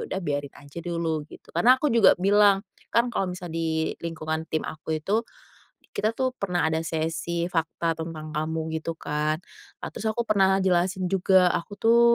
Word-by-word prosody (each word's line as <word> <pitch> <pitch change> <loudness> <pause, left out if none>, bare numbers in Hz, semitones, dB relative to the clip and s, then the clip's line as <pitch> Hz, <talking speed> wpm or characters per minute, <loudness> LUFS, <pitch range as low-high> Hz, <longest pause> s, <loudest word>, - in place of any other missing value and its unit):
udah 190 - -2
biarin 145 -2 -2
aja 145 +3 -11
dulu," 165 -2 -1
gitu, - - -15
karena 250 +2 +6
aku 290 -2 0
juga 230 -4 +6
bilang, 200 +1 +4 0.2
kan 235 +1 +2
kalau 195 -4 0
misalnya 180 -2 -6
di 165 0 -1 0.3
lingkungan 160 -1 -4
tim 155 - -1
aku 155 +1 -4
itu, 200 +8 0 0.7
kita 220 +2 -1
tuh 260 -1 0
pernah 180 -5 0
ada 160 0 0
sesi 165 +1 -2
fakta 165 0 0
tentang 160 -1 -6
kamu 160 0 -2
gitu 165 +1 -4
kan. 150 0 -1 0.5
Nah, - - -3
terus 220 - -3
aku 235 +2 -1
pernah 195 -3 +3
jelasin 185 +1 +1
juga 185 -1 +4
aku 170 - -3
tuh, 230 +3 +4
170 Hz, 175 wpm, -26 LUFS, 160-200 Hz, 0.7 s, karena